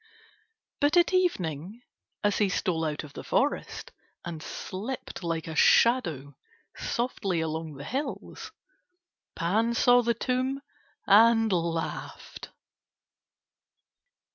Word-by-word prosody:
But 295 +4 +3
at 350 +2 +4
evening 200 - -1 0.4
as 205 -1 +1
he 205 -2 +3
stole 175 -3 -1
out 150 -1 -3
of 145 -1 -12
the - - -8
forest, - - -1 0.3
and 165 -2 -6
slipped 210 +11 -6
like 165 -2 -2
a 160 - -5
shadow 165 - +3 0.4
softly 205 -7 -2
along 160 -1 -3
the 135 - -8
hills, 270 - -5 0.8
Pan 220 +7 +1
saw 245 +1 +5
the 235 -1 0
tomb 255 +3 -1 0.5
and 225 +1 +5
laughed. 165 -2 -4
200 Hz, 105 wpm, -27 LUFS, 165-245 Hz, 0.8 s, saw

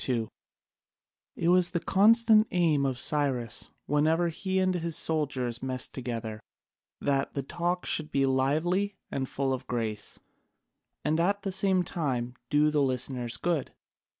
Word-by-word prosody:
[C.2] 115 -4 -1 1.1
It 170 - 0
was 180 0 +4
the 170 - -1
constant 215 +4 +5
aim 155 -6 +2
of 130 -2 -2
Cyrus 130 -5 -1 0.2
whenever 160 +4 +2
he 190 +3 -3
and 185 0 +2
his 170 -2 -2
soldiers 130 -7 +1
messed 130 -1 -2
together, 115 -4 -5 0.6
that 140 -1 0
the 140 - -2
talk 175 +5 -2
should 155 -1 0
be 135 0 +2
lively 155 +10 +1 0.2
and 130 -1 -3
full 135 -1 -1
of 130 0 -5
grace, 110 -4 -3 0.9
and 155 +2 +1
at 200 +4 +1
the 195 - -2
same 190 -1 +2
time 130 -8 -2 0.2
do 150 +1 +3
the 150 -1 +2
listeners 125 -2 -1
good. 170 -5 -2
150 Hz, 145 wpm, -28 LUFS, 130-175 Hz, 1.1 s, constant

